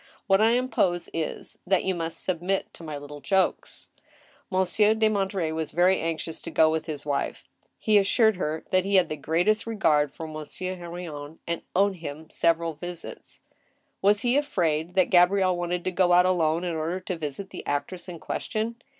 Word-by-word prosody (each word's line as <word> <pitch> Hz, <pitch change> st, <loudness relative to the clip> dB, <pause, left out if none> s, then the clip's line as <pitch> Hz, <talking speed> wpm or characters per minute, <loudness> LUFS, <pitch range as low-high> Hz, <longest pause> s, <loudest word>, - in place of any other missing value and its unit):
What 195 Hz, -1 st, +4 dB
I 225 Hz, +1 st, +5 dB
impose 215 Hz, -8 st, +1 dB
is, 160 Hz, -2 st, -4 dB
that 190 Hz, -1 st, +3 dB
you 190 Hz, -, 0 dB
must 165 Hz, -2 st, -4 dB
submit 185 Hz, +2 st, -1 dB
to -, -, -13 dB
my 155 Hz, -2 st, -5 dB
little 145 Hz, 0 st, -9 dB
jokes." 190 Hz, +3 st, -1 dB, 0.6 s
Monsieur 195 Hz, +3 st, +3 dB
de 220 Hz, 0 st, +3 dB
Monterey 195 Hz, -5 st, -1 dB
was 160 Hz, -1 st, -3 dB
very 180 Hz, +3 st, +3 dB
anxious 165 Hz, 0 st, -3 dB
to -, -, -6 dB
go 155 Hz, 0 st, +4 dB
with 160 Hz, 0 st, -2 dB
his 150 Hz, -3 st, -3 dB
wife. 145 Hz, -1 st, -2 dB, 0.3 s
He 215 Hz, -1 st, +4 dB
assured 220 Hz, +2 st, +3 dB
her 155 Hz, -2 st, -3 dB
that 185 Hz, 0 st, +3 dB
he 200 Hz, +1 st, 0 dB
had 185 Hz, -3 st, +4 dB
the 155 Hz, -, -2 dB
greatest 175 Hz, +10 st, +1 dB
regard 150 Hz, -10 st, +2 dB
for 160 Hz, -, -7 dB
Mo»3ieur 155 Hz, +4 st, -5 dB
He/irion, 170 Hz, -4 st, -8 dB
and 170 Hz, 0 st, -3 dB
owed 195 Hz, 0 st, +3 dB
him 160 Hz, -1 st, -8 dB
several 165 Hz, 0 st, +1 dB
visits. 175 Hz, +2 st, -8 dB, 0.6 s
Was 205 Hz, +1 st, +3 dB
be 245 Hz, +2 st, +3 dB
afraid 175 Hz, -, 0 dB
that 185 Hz, -2 st, +3 dB
Gabrielle 185 Hz, +1 st, +4 dB
wanted 175 Hz, 0 st, -2 dB
to 185 Hz, -, -1 dB
go 180 Hz, -1 st, +3 dB
out 180 Hz, +1 st, +6 dB
alone 170 Hz, -2 st, +2 dB
in 175 Hz, -2 st, -2 dB
order 165 Hz, +4 st, -2 dB
to 185 Hz, -, -4 dB
visit 160 Hz, +4 st, -5 dB
the -, -, -7 dB
actress 175 Hz, +6 st, -3 dB
in 175 Hz, -, -7 dB
question 225 Hz, +7 st, -3 dB
175 Hz, 185 wpm, -26 LUFS, 160-195 Hz, 0.6 s, out